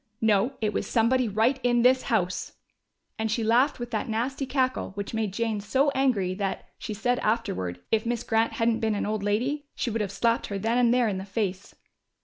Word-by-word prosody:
No, 220 +3 +2
it 215 -1 0
was 200 - -2
somebody 245 +2 +2
right 225 +6 +2
in 240 -1 +2
this 255 +1 +5
house!" 185 -5 -1 0.7
And 220 0 0
she 230 +1 0
laughed 240 +6 +3
with 240 0 -5
that 220 0 -2
nasty 255 +5 -2
cackle 255 -6 0
which 200 +1 -5
made 220 -3 -1
Jane 220 0 -1
so 265 +8 +2
angry, 245 -10 +1
that, 195 0 -3
she 215 - -5
said 245 +4 0
afterward, 95 - -1
if 220 -1 +2
Miss 235 0 -2
Grant 225 0 +1
hadn't 230 0 +1
been 220 -1 0
an - - -1
old 215 0 -2
lady, 250 +9 -1
she 240 - -2
would 225 0 -1
have 200 -2 -2
slapped 230 +4 +1
her 200 - -3
then 225 +5 +1
and 240 -1 +4
there 245 -1 +3
in 195 -3 -1
the - - -5
face. 195 -1 -3
225 Hz, 210 wpm, -26 LUFS, 205-245 Hz, 0.7 s, this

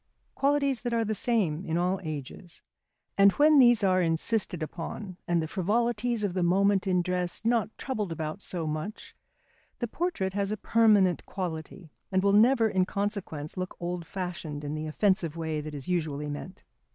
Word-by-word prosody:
Qualities 280 -3 +1
that 240 0 -1
are 230 -1 +1
the 215 - -1
same 195 -8 +1
in 165 -3 -1
all 180 +2 +1
ages. 155 +3 -7 0.6
And 200 0 +7
when 300 0 +5
these 240 -4 +6
are 185 -1 +3
insisted 170 +1 0
upon, 180 +4 -6
and 170 -2 +1
the - - -3
frivolities 230 +5 0
of 200 -3 -1
the 185 - -1
moment 195 +3 +3
in 180 -1 +2
dress 180 +3 -2
not 230 -2 +2
troubled 215 -9 -3
about 160 +3 -4
so 175 -5 -3
much, 155 +8 -5 0.6
the 240 - -2
portrait 230 - -2
has 200 0 -1
a 215 - -2
permanent 210 -4 +3
quality, 170 -2 -6 0.2
and 190 0 +2
will 200 0 +3
never 230 +2 +5
in 190 -3 +1
consequence 200 -8 -3
look 185 0 -4
old 175 -1 -4
fashioned 170 -6 -5
in 145 0 -4
the 155 0 -4
offensive 170 -1 +1
way 160 -2 -2
that 150 0 -7
is 140 - -7
usually 155 -5 -1
meant. 175 +6 -8
185 Hz, 175 wpm, -28 LUFS, 165-215 Hz, 0.6 s, And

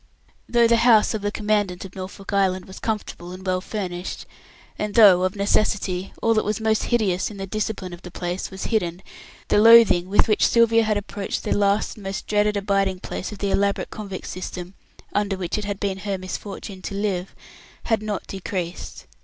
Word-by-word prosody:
Though 235 -1 +4
the 235 0 +4
house 230 -2 +5
of 220 - -3
the 205 0 -1
Commandant 205 -4 -1
of 185 - -11
Norfolk 190 +2 -7
Island 190 -2 +1
was 190 - -11
comfortable 210 -5 -4
and 185 +1 -10
well 185 -1 0
furnished, 185 -3 -5 0.5
and 210 -1 -3
though, 200 -6 +8
of 185 +1 0
necessity, 200 -2 0
all 230 - +4
that 215 - +2
was 210 0 -1
most 220 -1 +1
hideous 205 -7 +1
in 210 - -10
the 195 - -4
"discipline" 205 -2 -3
of 175 - -10
the 180 - -9
place 175 +1 -4
was 190 -1 -7
hidden, 175 -4 -1 0.5
the - - +4
loathing 225 -5 +7
with 205 - +3
which 215 - +3
Sylvia 230 -1 +4
had 215 -1 +1
approached 205 0 -4
the - - -3
last 200 +1 +1
and 210 - -11
most 195 0 -4
dreaded 210 0 +1
abiding 195 -2 0
place 185 - -5
of 210 - -8
the 200 0 -1
elaborate 200 0 0
convict 200 -3 -7
system, 185 0 -6 0.4
under 205 -2 0
which 185 +2 -2
it 210 - -5
had 200 -1 -4
been 195 -2 -2
her 195 0 -2
misfortune 190 +1 -7
to 200 - -5
live, 195 -3 -2 0.5
had 225 -2 +1
not 210 -2 -3
decreased. 185 -2 -5
200 Hz, 195 wpm, -23 LUFS, 185-215 Hz, 0.5 s, though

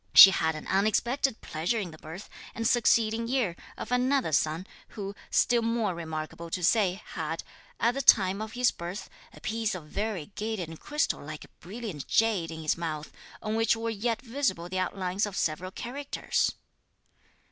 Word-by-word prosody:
She 195 - +13
had 160 -3 +1
an 155 - -7
unexpected 225 +6 +1
(pleasure) 165 +9 -1
in 190 -6 -3
the 155 - -12
birth, 165 +6 -9 0.3
the 230 - -3
succeeding 230 -1 +3
year, 240 -9 +1 0.2
of - - -6
another 255 - +2
son, 155 +4 +1 0.2
who, 200 -2 -6 0.2
still 240 -1 +3
more 230 -4 0
remarkable 160 0 -5
to 180 +2 -3
say, 195 0 +3
had, 160 -1 -3 0.4
at 235 +1 +3
the 275 - -1
time 195 -5 +5
of 220 0 -5
his 250 0 +3
birth, 175 +4 -7 0.2
a - - -14
piece 220 -2 -1
of 170 -4 -7
variegated 205 0 -3
and 165 - -9
crystal 295 - -1
like 155 +1 -7
brilliant 195 - -6
jade 215 -7 +2
in 160 -1 -6
his 155 +2 +1
mouth, 155 -3 -4 0.3
on 215 - -1
which 225 +1 +3
were 225 0 -2
yet 225 +2 -1
visible 230 -9 -1
the 185 +1 -2
outlines 185 +2 -1
of 200 - -6
several 170 +4 -1
characters. 270 +8 -1
200 Hz, 170 wpm, -29 LUFS, 170-230 Hz, 0.4 s, She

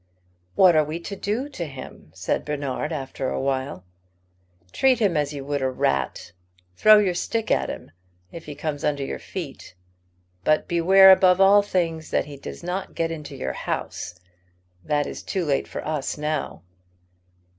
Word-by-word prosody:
"What 185 -3 +6
are 155 - +5
we 155 +3 -5
to 200 - -6
do 215 +8 -2
to 175 - -5
him?" 135 -2 -10
said - - -1
Bernard, 145 0 -3
after 135 -3 -3
a - - -2
while. 130 -9 -2 0.9
"Treat 265 -2 +3
him 200 -7 +1
as 145 -1 0
you 140 -2 -6
would 145 0 -2
a 130 - +1
rat. 70 - -1 0.4
Throw 215 - +7
your 200 -4 +2
stick 220 +5 -2
at - - +2
him, - - -7 0.4
if 165 - -9
he 150 - -6
comes 145 -1 -4
under 145 -2 0
your - - -5
feet; 150 - -8 0.7
but 155 +8 +2
beware, 190 +3 +7
above 185 -1 +5
all 195 +1 +7
things, 165 -5 -2
that - - +1
he 145 -1 -9
does 140 - -9
not 180 +2 -4
get 165 0 -1
into 155 -3 -7
your 65 0 -3
house. 90 - -4 0.7
That 145 -1 0
is - - -6
too 185 -3 -2
late 140 -2 0
for - - -6
us 150 -3 -2
now." 150 -6 -3
155 Hz, 170 wpm, -24 LUFS, 140-185 Hz, 0.9 s, Throw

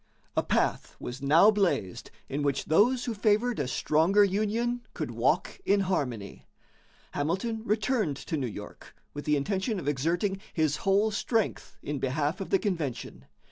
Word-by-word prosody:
A - - +3
path - - 0
was 125 +2 -6
now 160 +9 +6
blazed 185 - -1 0.2
in 140 +2 -3
which 140 -1 0
those 240 +10 +3
who 235 - -2
favored 215 +3 +1
a 140 - -1
stronger 160 +9 +3
union 215 +5 0
could - - -3
walk - - 0
in 200 - +3
harmony. 125 - -3 0.6
Hamilton 190 +10 -2
returned 215 - 0
to 160 - -4
New 135 -4 -1
York 105 -2 -10 0.2
with 145 - -6
the 150 -1 +3
intention 190 - -1
of 145 - -7
exerting 170 +8 0
his 155 -2 +1
whole 200 +3 +2
strength 220 +1 -1
in 145 -1 -3
behalf 145 +7 -1
of 195 - -5
the 195 - +4
convention. 150 - -3
185 Hz, 155 wpm, -28 LUFS, 145-210 Hz, 0.6 s, now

